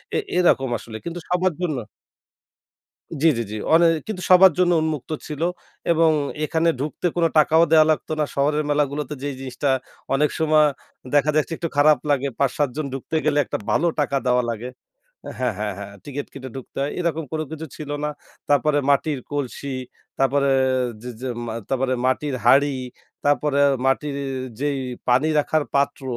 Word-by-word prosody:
এ - - +3 0.2
এরকম 135 -7 +3
আসলে 110 0 -9
কিন্তু 170 +1 -4
সবার 180 0 +1
জন্য 160 -6 -1 1.5
জি, - - +5
জি, - - 0
জি। 105 - -4 0.2
অনে 170 +1 +6 0.2
কিন্তু 205 -4 -5
সবার 185 0 +8
জন্য 180 -1 +4
উন্মুক্ত 155 -2 -3 0.2
ছিল 150 0 -5 0.5
এবং 165 -1 +4 0.3
এখানে 160 +2 +1
ঢুকতে 150 +5 -3
কোন 170 - +2
টাকাও 160 +2 +5
দেয়া 155 -1 +7
লাগতো 155 0 -1
না। 150 - +3
শহরের 150 +2 +1
মেলাগুলোতে 145 0 0
যেই 145 -1 -3
জিনিসটা 135 +1 -2 0.4
অনেক 150 +2 +2
সময় 155 -1 +4 0.5
দেখা 145 +1 +4
যাচ্ছে 155 +2 +1
একটু 170 - -3
খারাপ 150 0 +5
লাগে। 140 -1 +2
৫-৭ 140 +1 +1
জন 155 -2 -2
ঢুকতে 135 +4 -4
গেলে 150 -1 +2
একটা - - -3
ভালো 170 - +2
টাকা 140 -1 0
দেওয়া 125 0 +3
লাগে। 115 +2 -5 0.7
হ্যাঁ, 125 -4 0
হ্যাঁ, 105 -2 -2
হ্যাঁ, 100 0 -8
টিকেট 145 0 -5
কেটে 130 -1 -8
ঢুকতে 130 - -9
হয়। 145 - -2
এরকম 165 -2 -1
কোনো 155 0 -1
কিছু 160 0 -6
ছিল 150 -2 -7
না। 150 - 0 0.4
তারপরে 145 +1 +3
মাটির 140 +1 +2
কলসি, 140 -1 -4 0.4
তারপরে 140 +1 +2 0.5
যে, 125 - -6
যে 130 - -4 0.2
মা 115 - -4 0.2
তারপরে 130 -1 0
মাটির 135 +2 0
হাঁড়ি, 140 +3 +5 0.5
তারপরে 145 0 +2 0.3
মাটির 140 +2 0 0.4
যেই 145 -1 0 0.3
পানি 130 +5 +4
রাখার 150 +1 +1
পাত্র, 140 0 +1
145 Hz, 165 wpm, -22 LUFS, 135-155 Hz, 1.5 s, সবার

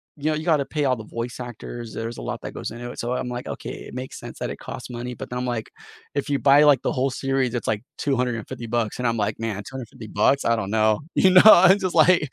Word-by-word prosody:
you 145 - -10
know, 155 - +1
you 155 - -5
gotta 150 -5 +2
pay 150 -2 -2
all 130 -2 +2
the 110 - -8
voice 115 +3 -5
actors, 120 -1 -7
there's 115 +1 -5
a - - -7
lot - - -4
that - - -5
goes - - -5
into 120 +2 -7
it. - - -10
So, 120 +1 -2
I'm 125 0 -3
like, 120 0 -5
"Okay, - - -6
it - - -11
makes 130 +1 -6
sense - - -9
that - - -3
it - - -7
costs - - -8
money." 120 +1 -5
But - - -8
then 125 - -2
I'm 125 - -2
like 120 -3 -3 0.4
if 140 0 -2
you 140 - +2
buy, 140 +3 +5
like, 145 -2 +5
the - - 0
whole 135 +1 0
series, 135 -1 -1
it's 120 - -3
like 105 -1 0 0.2
250 125 -3 -2
bucks, 115 -1 -1
and 125 - 0
I'm 115 0 0
like, 105 0 -1
"Man, 115 -2 -2
250 120 -1 -9
bucks, 110 +7 +2
I 115 - +3
don't 110 -4 -3
know." 110 0 +2 0.2
you 190 - +5
know, 185 - +9
I'm 190 -1 +8
just 185 -3 -2
like 160 -2 +5
125 Hz, 275 wpm, -23 LUFS, 115-140 Hz, 0.4 s, know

